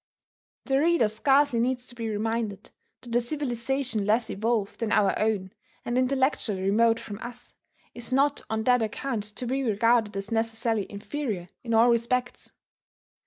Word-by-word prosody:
The 270 Hz, 0 st, +2 dB
reader 330 Hz, -6 st, +3 dB
scarcely 270 Hz, +4 st, +2 dB
needs 250 Hz, +1 st, 0 dB
to 250 Hz, -, -8 dB
be 230 Hz, -2 st, -4 dB
reminded 215 Hz, -1 st, -3 dB, 0.3 s
that 235 Hz, -1 st, -6 dB
a 240 Hz, -, +4 dB
civilization 250 Hz, -3 st, -2 dB
less 220 Hz, +3 st, +1 dB
evolved 215 Hz, 0 st, -1 dB
than 225 Hz, -2 st, -2 dB
our 200 Hz, -2 st, +3 dB
own, 205 Hz, -3 st, 0 dB, 0.3 s
and 240 Hz, -, -2 dB
intellectually 255 Hz, -6 st, +1 dB
remote 225 Hz, +4 st, +3 dB
from 205 Hz, -1 st, -8 dB
us, 240 Hz, +1 st, -9 dB, 0.4 s
is 240 Hz, +1 st, -8 dB
not 280 Hz, +2 st, +2 dB
on 220 Hz, 0 st, -1 dB
that 250 Hz, 0 st, +4 dB
account 225 Hz, +2 st, -2 dB
to 210 Hz, +4 st, -6 dB
be 265 Hz, +3 st, -1 dB
regarded 230 Hz, -2 st, +2 dB
as 195 Hz, +3 st, -4 dB
necessarily 225 Hz, -1 st, -1 dB
inferior 205 Hz, -3 st, -4 dB
in 230 Hz, -2 st, 0 dB
all 230 Hz, +2 st, +6 dB
respects. 245 Hz, +2 st, -1 dB
230 Hz, 155 wpm, -27 LUFS, 215-250 Hz, 0.4 s, all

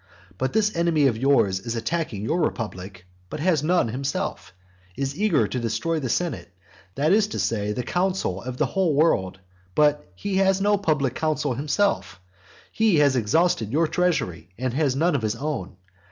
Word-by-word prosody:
But 130 Hz, -, -1 dB
this 215 Hz, -1 st, +1 dB
enemy 170 Hz, -3 st, +2 dB
of 125 Hz, -4 st, +3 dB
yours 110 Hz, -6 st, +2 dB
is 115 Hz, +4 st, -5 dB
attacking 115 Hz, -3 st, -2 dB
your 160 Hz, +10 st, 0 dB
republic, 95 Hz, -, -4 dB, 0.2 s
but -, -, -6 dB
has 165 Hz, -2 st, +2 dB
none 165 Hz, -6 st, +2 dB
himself; 135 Hz, +4 st, -3 dB, 0.5 s
is 135 Hz, 0 st, -2 dB
eager 175 Hz, -, +2 dB
to 125 Hz, -, -3 dB
destroy 120 Hz, +8 st, -1 dB
the 130 Hz, -4 st, -3 dB
senate, 175 Hz, -, -2 dB, 0.4 s
that 150 Hz, +6 st, +2 dB
is 210 Hz, 0 st, +4 dB
to 210 Hz, -, -5 dB
say, 105 Hz, -2 st, -1 dB
the 125 Hz, +4 st, -3 dB
council 180 Hz, -, -1 dB
of 125 Hz, +2 st, -6 dB
the -, -, +2 dB
whole 185 Hz, -6 st, 0 dB
world, 95 Hz, -, +2 dB, 0.4 s
but 150 Hz, -9 st, +2 dB
has 195 Hz, -1 st, +2 dB
no 205 Hz, +1 st, +3 dB
public 150 Hz, -9 st, 0 dB
council 150 Hz, -2 st, -1 dB
himself; 150 Hz, -, -1 dB, 0.5 s
he 220 Hz, -4 st, +2 dB
has 145 Hz, -3 st, +4 dB
exhausted 115 Hz, -, +1 dB
your 160 Hz, +5 st, +2 dB
treasury, 155 Hz, -, -1 dB
and 130 Hz, +1 st, -2 dB
has 140 Hz, -2 st, +1 dB
none 165 Hz, +5 st, +2 dB
of 140 Hz, -, 0 dB
his 110 Hz, 0 st, -1 dB
own. 135 Hz, -10 st, -4 dB
145 Hz, 170 wpm, -24 LUFS, 115-170 Hz, 0.5 s, is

